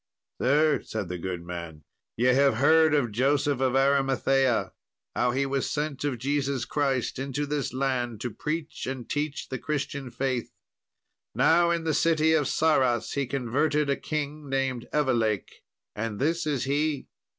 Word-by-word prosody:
"Sir," 150 +4 +3
said 105 -5 -5
the 90 -1 -4
good 90 -1 -4
man, 85 -3 -7 0.3
"ye 120 - +1
have 140 -2 +4
heard 155 +4 +5
of 125 -6 +1
Joseph 140 +4 +1
of 130 -1 +1
Arimathea, 135 -2 +2 0.4
how - - +2
he 135 +3 0
was 135 -1 -1
sent 150 -2 -3
of 140 -4 -1
Jesus 135 0 -1
Christ 135 -4 -1
into 140 +2 -2
this 145 -1 -2
land 125 -4 -1
to 120 - -3
preach 155 +4 -4
and 130 -3 -5
teach 145 0 -3
the 130 - -4
Christian 140 -2 -3
faith. 130 -1 -2 0.8
Now, 170 +1 +4
in 170 -1 0
the 160 -1 0
city 160 -1 +3
of 150 -3 +2
Sarras 130 -7 +2
he 140 -2 -1
converted 140 +3 0
a - - +2
king 150 0 -4
named 135 -3 -1
Evelake, 120 -8 0 0.3
and 105 -1 -3
this 160 +5 0
is 145 -5 0
he. 145 +1 -1
135 Hz, 155 wpm, -27 LUFS, 125-150 Hz, 0.8 s, heard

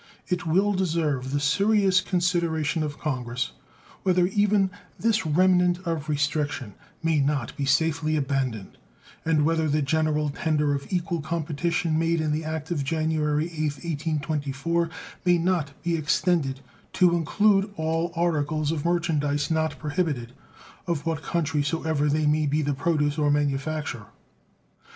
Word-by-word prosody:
It 180 -2 -1
will 195 +6 +3
deserve 160 -8 0
the 145 +2 0
serious 190 +5 +3
consideration 170 -3 0
of 150 -2 -3
Congress 125 -4 -3 0.5
whether 180 -2 +3
even 200 0 +2 0.3
this 225 -5 +1
remnant 180 +2 +4
of 160 -3 -2
restriction 145 -6 -1 0.3
may 160 -2 +2
not 140 -3 0
be 140 - -2
safely 155 +2 +1
abandoned, 135 -7 -2 0.4
and 155 -2 +2
whether 160 -1 +1
the 150 +1 +1
general 150 0 +1
tender 150 0 0
of 140 +5 -5
equal 175 -2 -1
competition 160 +1 -1
made 165 0 +1
in 155 -1 0
the 155 +2 -1
act 155 +1 -4
of 150 -5 0
January 155 0 0
8th, 155 -2 -3
1824, 155 +1 -1 0.3
maynot 175 -4 +2
be 170 0 +1
extended 150 -3 +1 0.3
to 180 -2 +4
include 195 +5 +2
all 165 +2 -1
articles 155 -2 0
of 155 -3 -2
merchandise 155 -4 0
not 160 0 0
prohibited, 145 -6 -2 0.5
of 165 -4 -2
what 160 -2 -1
country 160 -3 0
so 145 +3 -2
ever 155 -2 +1
they 155 +1 +1
may 150 0 +2
be 150 +2 +1
the 145 0 0
produce 150 0 0
or 150 -1 +2
manufacture. 145 -4 -1
155 Hz, 140 wpm, -25 LUFS, 145-170 Hz, 0.5 s, remnant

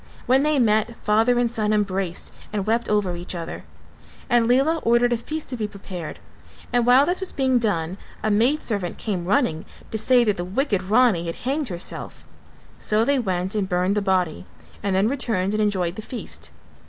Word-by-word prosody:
When 260 +2 +4
they 300 0 +2
met, 220 -1 +2
father 225 +4 +3
and 245 - +3
son 215 -3 0
embraced 195 -4 -1 0.2
and 205 -3 -2
wept 230 +2 0
over 205 -4 +1
each 175 +1 -5
other; 165 -1 -6 0.7
and 240 -1 +4
Lela 270 +7 +3
ordered 240 +1 +3
a - - +1
feast 310 +7 -6
to 255 - -3
be 215 -3 -2
prepared 190 -5 -8 0.6
and 245 -1 +2
while 255 +3 +7
this 355 +3 0
was 380 - -4
being 260 -2 +2
done 190 -4 -1 0.2
a 215 - +1
maidservant 215 - +1
came 190 -6 -3
running 190 - +1 0.3
to 220 - -1
say 245 +3 +4
that 210 -4 +1
the 175 - -2
wicked 200 +2 0
Rani 200 -3 +3
had 165 - -3
hanged 280 +2 0
herself, 175 -1 -5 0.5
so 215 +1 +2
they 280 +1 +2
went 185 -4 -1
and 200 -3 -1
burned 180 +1 +1
the 210 - +1
body 185 -5 0 0.4
and 195 -1 0
then 195 +3 +3
returned 220 -7 -1
and 215 - +1
enjoyed 185 -4 0
the 220 - -6
feast. 235 +2 -6
215 Hz, 190 wpm, -23 LUFS, 190-245 Hz, 0.7 s, while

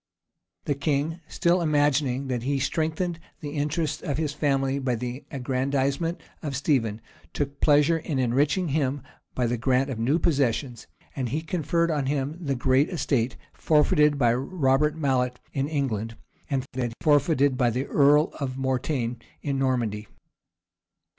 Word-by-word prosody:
The 145 - +1
king, 150 +3 -1
still 175 +1 +1
imagining 145 -4 +1
that 125 -3 -2
he 140 +3 0
strengthened 160 +5 -1 0.2
the 145 -4 -6
interests 150 +2 -1
of 145 -6 -2
his 155 -2 -1
family 135 -2 0
by 130 -2 0
the 125 +3 -5
aggrandizement 135 +5 -1 0.2
of 145 -4 -4
Stephen, 120 -6 0 0.3
took 140 -1 -3
pleasure 150 +2 +4
in 155 -3 -3
enriching 140 +8 +1
him 140 -2 0 0.3
by 125 - +1
the 120 +1 0
grant 130 +2 +1
of 115 - -4
new 130 +8 +2
possessions; 135 -6 0 0.3
and 130 -4 -2
he 150 +6 -1
conferred 170 0 0
on 145 -4 -1
him 140 +1 -1
the 140 -3 0
great 130 +3 +2
estate 135 -8 -1 0.2
forfeited 150 -1 +3
by 120 -4 +3
Robert 135 +2 +1
Mallet 125 -4 0
in 135 0 0
England, 115 -7 -2 0.3
and 135 -3 -1
that 125 -3 -2
forfeited 145 -2 +3
by 125 -1 +2
the 125 +4 -2
earl 145 +2 +4
of 130 -2 -3
Mortaigne 130 -2 -1 0.3
in 140 -2 -1
Normandy. 115 -6 -1
140 Hz, 145 wpm, -26 LUFS, 130-150 Hz, 0.3 s, pleasure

